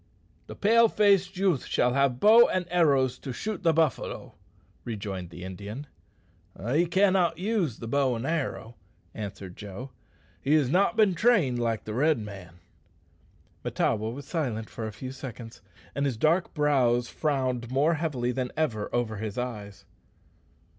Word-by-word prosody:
"The - - -8
pale 230 +3 +5
faced 195 -3 +3
youth 185 -8 +1
shall 125 0 +1
have 140 0 +3
a - - -11
bow 220 - +7
and 185 -1 -1
arrows 140 -7 +2
to 135 - -6
shoot 215 - -4
the 165 - +4
buffalo," 160 -2 -1 0.5
rejoined 100 -6 -5
the 90 +1 -10
Indian. 100 +8 -7 0.9
"He 165 +5 +3
cannot 185 -2 +3
use 185 - -1
the 115 - -7
bow 135 0 +1
and 115 +2 -4
arrow," 140 -7 -3 0.4
answered 100 -3 -7
Joe. 105 +6 -8 0.5
"He 145 +3 +2
has 140 -4 +2
not 200 +6 +2
been 210 -4 +4
trained 175 - +2
like 115 -2 -1
the 105 - -6
Red 150 +6 +2
man." 95 -6 -9 1.1
Mahtawa 110 0 0
was 140 +3 -8
silent 125 -10 -3
for 110 - -5
a - - -5
few 130 +5 -7
seconds, 125 -3 -9 0.3
and 140 +2 0
his 125 -5 -3
dark 165 +9 +1
brows 130 -5 +2
frowned 130 -6 -1
more 140 +6 +2
heavily 145 -7 -1
than 125 0 -3
ever 115 -10 -1
over 115 -3 -1
his 105 +1 -5
eyes. 105 -5 -5
130 Hz, 155 wpm, -27 LUFS, 115-165 Hz, 1.1 s, bow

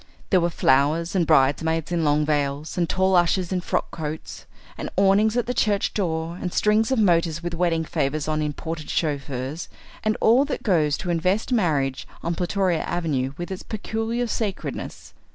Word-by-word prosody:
There 185 -3 +5
were 170 - +2
flowers, 155 +3 +2
and 175 -4 +2
bridesmaids 160 +3 +2
in 170 -2 +1
long 150 0 +2
veils, 145 0 -1
and 170 -3 0
tall 190 0 +2
ushers 175 +1 +2
in 185 -1 0
frock - - -2
coats, 160 -2 -6 0.3
and - - -5
awnings 200 +4 +4
at 245 - +1
the 250 - -2
church 205 -5 +1
door, 170 -3 -2
and 180 - -2
strings 215 +3 +2
of 265 - +1
motors 170 -5 +2
with 175 0 -3
wedding 165 -1 0
favours 150 -1 -1
on 155 0 0
imported 155 +1 -4
chauffeurs, 140 0 -2 0.3
and 215 0 +1
all 240 +5 +5
that 290 - -4
goes 155 -8 +2
to 175 - -3
invest 185 +8 0
marriage 145 - 0 0.2
on 170 - -1
Plutoria 180 -1 0
Avenue 140 -6 -1
with 175 +2 -5
its 190 - -5
peculiar 225 +2 -3
sacredness. 215 -4 -4
170 Hz, 170 wpm, -24 LUFS, 155-195 Hz, 0.3 s, There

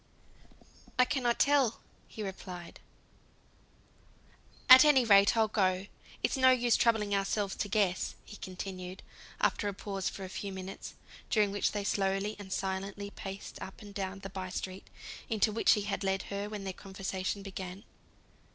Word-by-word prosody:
"I 250 - +6
cannot 250 -3 0
tell," 275 -5 +3 0.4
replied 185 -4 -7 1.9
he. 255 - +11
"At 260 - +11
any 280 -5 +5
rate 200 0 +6
I'll 220 -1 +4
go. 190 -3 +1 0.4
It's - - +2
no 260 -1 +6
use 245 -2 +4
troubling 220 -3 +2
ourselves 200 0 0
to - - -1
guess," 195 -3 +1
he 210 - -10
continued, 185 0 -7 0.4
after 205 - +1
a 200 - -3
pause 195 -1 -3
of - - -9
a 190 - -4
few 200 +1 -5
minutes, 190 0 -7 0.3
during 210 -3 +3
which 205 - +1
they 205 -1 -2
slowly 195 +1 0
and 195 -2 -9
silently 195 +1 -3
paced 195 -1 -8
up 190 - -8
and 205 -1 -11
down 195 0 -4
the 195 - -7
by 185 -1 -5
street, 185 +1 -5 0.4
into 220 -1 +2
which 225 - +4
he 210 - 0
had 200 0 -3
led 195 0 0
her 200 +1 -3
when 210 -2 -6
their 190 -1 -4
conversation 190 +1 -4
began. 190 0 -7
200 Hz, 160 wpm, -31 LUFS, 190-215 Hz, 1.9 s, he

